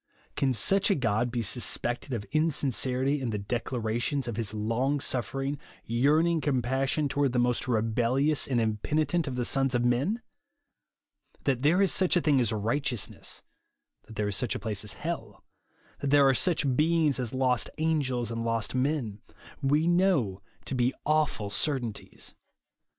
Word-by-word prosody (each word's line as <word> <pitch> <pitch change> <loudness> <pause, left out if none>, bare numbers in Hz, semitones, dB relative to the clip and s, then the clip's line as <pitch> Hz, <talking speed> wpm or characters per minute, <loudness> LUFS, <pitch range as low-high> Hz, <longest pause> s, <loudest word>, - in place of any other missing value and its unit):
Can 135 - +1
such 195 - +2
a 200 - +4
God 115 -2 0
be 120 -1 -2
suspected 120 +3 -1
of 110 -5 -3
insincerity 140 -3 0
in 125 - -2
the 105 - -2
declarations 120 +4 -2
of 120 - -3
his 110 -3 -2
long 115 +7 0
suffering, 135 +4 -2 0.3
yerarn 145 +8 +3
ing 170 -2 +1
compassion 135 +2 0
toward 140 -2 0
the - - 0
most 120 0 +1
rebellious 125 +5 +1
and 125 -3 +1
impenitent 145 +9 0
of 130 - -3
the 125 -1 -1
sons 135 0 +1
of 120 0 +1
men? 145 - +1 1.2
That 130 -3 0
there 170 +8 +4
is 195 - +3
such 185 -1 +2
a - - +2
thing 145 -4 +3
as 120 -3 +1
righteousness; 115 +2 -3 0.6
that 110 - -11
there 105 0 -1
is 100 - -2
such 120 0 -1
a - - -3
place 105 -3 -3
as 105 - -3
hell; 130 -11 -6 0.6
that 140 - -2
there 140 -1 +6
are 135 - +5
such 145 -2 +1
beings 155 -1 +2
as 120 -3 -3
lost 130 -2 +1
angels 135 -7 0
and 115 0 -3
lost 115 -2 -1
men, 130 -6 -1 0.4
we 145 +4 +2
know 175 - +2 0.2
to - - -4
be 125 0 +1
awful 150 -9 +1
certainties. 125 -5 -3
130 Hz, 160 wpm, -28 LUFS, 115-145 Hz, 1.2 s, there